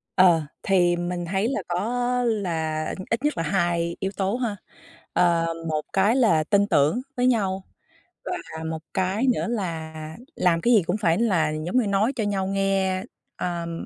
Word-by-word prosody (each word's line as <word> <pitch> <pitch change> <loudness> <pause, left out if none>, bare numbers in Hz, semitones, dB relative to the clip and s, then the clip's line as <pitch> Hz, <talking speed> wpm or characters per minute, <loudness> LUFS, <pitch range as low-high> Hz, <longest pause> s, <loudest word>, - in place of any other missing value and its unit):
Ờ, 175 -3 +6 0.2
thì 175 -2 +3
mình 175 0 -3
thấy 195 +5 0
là - - -1
có 245 +7 0
là 165 -8 -1 0.2
ít 230 +4 -1
nhất 295 - 0
là 165 - 0
2 170 0 0
yếu 190 0 -2
tố 195 +3 0
ha. 235 -5 -2 0.6
Ờ, 170 -2 +3 0.2
một 155 -1 0
cái 200 +5 +3
là 175 -12 +4
tin 200 +3 +2
tưởng 155 - +3 0.2
với 250 - +3
nhau, 195 -6 +1 0.6
và 160 - -5
một 160 0 -3
cái 190 +6 0
nữa - - -2
là 170 -9 -3 0.4
làm 170 -2 +2
cái 240 +5 +3
gì 210 - +5
cũng 180 +4 -1
phải 175 -5 +2
là 185 -10 +2
giống 155 +8 -2
như 235 -5 +2
nói 205 +7 +2
cho 225 - -1
nhau 195 -2 -1
nghe, 195 -1 0 0.3
ờm, 170 -1 -4
190 Hz, 175 wpm, -24 LUFS, 170-215 Hz, 0.6 s, Ờ